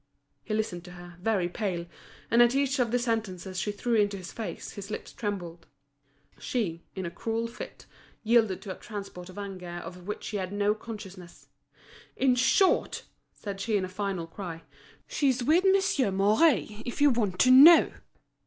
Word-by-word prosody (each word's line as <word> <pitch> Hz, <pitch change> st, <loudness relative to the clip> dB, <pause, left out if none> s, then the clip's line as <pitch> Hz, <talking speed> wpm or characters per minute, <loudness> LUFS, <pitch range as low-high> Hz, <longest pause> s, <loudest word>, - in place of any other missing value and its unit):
He 215 Hz, -, -2 dB
listened 195 Hz, -5 st, -2 dB
to 180 Hz, -, -11 dB
her, 175 Hz, 0 st, -11 dB
very 195 Hz, -4 st, +1 dB
pale; 180 Hz, -2 st, -3 dB, 0.5 s
and 235 Hz, -, +6 dB
at 240 Hz, +1 st, +5 dB
each 275 Hz, 0 st, +1 dB
of 245 Hz, -2 st, +2 dB
the 245 Hz, -, +2 dB
sentences 210 Hz, -6 st, -2 dB
she 210 Hz, -, -1 dB
threw 235 Hz, +4 st, -2 dB
into 205 Hz, -2 st, +2 dB
his 185 Hz, -1 st, -8 dB
face, 225 Hz, -, -6 dB
his 200 Hz, 0 st, -8 dB
lips -, -, -6 dB
trembled. 180 Hz, -6 st, -5 dB, 0.7 s
She, 180 Hz, -10 st, -2 dB
in 190 Hz, -2 st, -4 dB
a 170 Hz, -, -4 dB
cruel 225 Hz, +5 st, -2 dB
fit, 230 Hz, -, -9 dB, 0.4 s
yielded 220 Hz, -4 st, +2 dB
to 190 Hz, -3 st, -5 dB
a -, -, -19 dB
transport 200 Hz, -4 st, -8 dB
of 185 Hz, -, -12 dB
anger 195 Hz, -3 st, -6 dB
of 175 Hz, +1 st, -8 dB
which 210 Hz, -, -4 dB
she 210 Hz, -, -3 dB
had 185 Hz, -1 st, -4 dB
no 205 Hz, +1 st, +1 dB
consciousness. 205 Hz, -5 st, -10 dB, 0.7 s
"In 260 Hz, -1 st, +3 dB
short," 370 Hz, +10 st, +2 dB, 0.3 s
said 200 Hz, -2 st, -7 dB
she 215 Hz, 0 st, +1 dB
in 190 Hz, -, -1 dB
a -, -, -8 dB
final 190 Hz, -2 st, -3 dB
cry, 165 Hz, -1 st, -8 dB, 0.4 s
"she's 260 Hz, -4 st, 0 dB
with 320 Hz, +8 st, +4 dB
Monsieur 385 Hz, -, +3 dB
Mouret, 210 Hz, +3 st, +2 dB
if 240 Hz, -, -6 dB
you 290 Hz, -1 st, +6 dB
want 210 Hz, -7 st, 0 dB
to 255 Hz, -, +6 dB
know!" 300 Hz, +6 st, +9 dB
205 Hz, 175 wpm, -28 LUFS, 185-235 Hz, 0.7 s, know